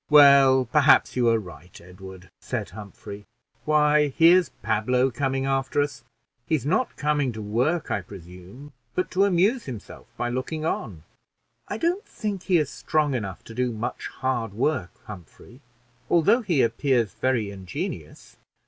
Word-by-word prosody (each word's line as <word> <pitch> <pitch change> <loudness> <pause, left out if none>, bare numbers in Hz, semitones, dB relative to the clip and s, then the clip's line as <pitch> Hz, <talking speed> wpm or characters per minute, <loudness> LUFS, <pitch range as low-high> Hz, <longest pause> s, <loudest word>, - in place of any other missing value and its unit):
"Well, 140 -3 +7
perhaps 145 +4 +4
you 120 -2 +3
are 115 - +3
right, 90 -4 -11
Edward," 90 +1 -13
said - - -5
Humphrey. 105 0 -10 0.4
"Why, 150 -1 +3
here's 165 +4 +4
Pablo 125 +4 +1
coming 135 +1 -1
after 135 0 -1
us; 145 -4 -2 0.4
he's 155 -6 0
not 185 - 0
coming 145 -3 0
to 110 - -7
work, 125 +11 -1
I 100 - 0
presume, 95 - -13 0.2
but 180 - -1
to 195 +2 +3
amuse 200 +6 +2
himself 120 -6 -9
by 120 - -2
looking 145 +6 -4
on." 100 - -4 0.6
"I 205 - -4
don't 350 - -1
think 205 - -5
he's 160 -7 +2
strong 150 -2 0
enough 100 -7 -5
to 115 - -11
do 125 +1 -1
much 110 +1 -5
hard 120 -5 -3
work, 125 - 0 0.2
Humphrey, 110 - -13 0.5
although 200 +9 +4
he 175 - +1
appears 115 -1 0
very 120 -6 -1
ingenious." 95 -2 -7
130 Hz, 145 wpm, -24 LUFS, 110-150 Hz, 0.6 s, Well